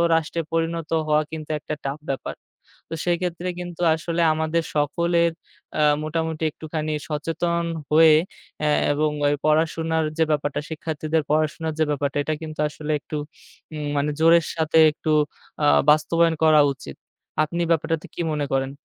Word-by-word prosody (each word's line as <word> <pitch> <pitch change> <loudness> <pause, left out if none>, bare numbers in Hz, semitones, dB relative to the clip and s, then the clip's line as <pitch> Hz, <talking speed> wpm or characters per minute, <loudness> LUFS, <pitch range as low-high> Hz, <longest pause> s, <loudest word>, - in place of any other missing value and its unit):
রাষ্ট্রে 165 +1 -1
পরিণত 165 -1 -1 0.2
হওয়া 150 0 +3
কিন্তু 155 -1 -7
একটা 155 - -5
tough 140 +2 -4
ব্যাপার। 135 - -5 0.5
তো - - -6
সেইক্ষেত্রে 175 0 -1
কিন্তু 175 -1 -7
আসলে 170 +1 -2
আমাদের 160 +1 0
সকলের 170 +3 +2 0.4
অ্যা 150 - +3 0.2
মোটামুটি 160 0 -2
একটুখানি 155 0 -4 0.2
সচেতন 170 +3 -1 0.3
হয়ে 155 0 +7 0.5
অ্যা 150 - +2 0.2
এবং 150 +1 +1 0.2
ওই 145 - +3
পড়াশোনার 160 +1 +1
যে 160 - +4
ব্যাপারটা, 145 -1 0
শিক্ষার্থীদের 155 0 -2
পড়াশোনার 155 +1 0
যে - - +5
ব্যাপারটা 140 0 -1
এটা 155 - -1
কিন্তু 155 -1 -8
আসলে 150 +1 -5
একটু 150 - -6 0.6
উম 150 -1 -4
মানে 150 +1 +1
জোরের 165 0 +5
সাথে 160 0 +1
একটু 155 +1 -3 0.5
আ - - +5 0.2
বাস্তবায়ন 165 +2 +3
করা 155 -1 +6
উচিত। 70 - -10 0.5
আপনি 170 +3 -2
ব্যাপারটাতে 165 0 0
কি - - -3
মনে 145 -1 -1
করেন? 135 0 0
155 Hz, 145 wpm, -23 LUFS, 150-165 Hz, 0.6 s, হয়ে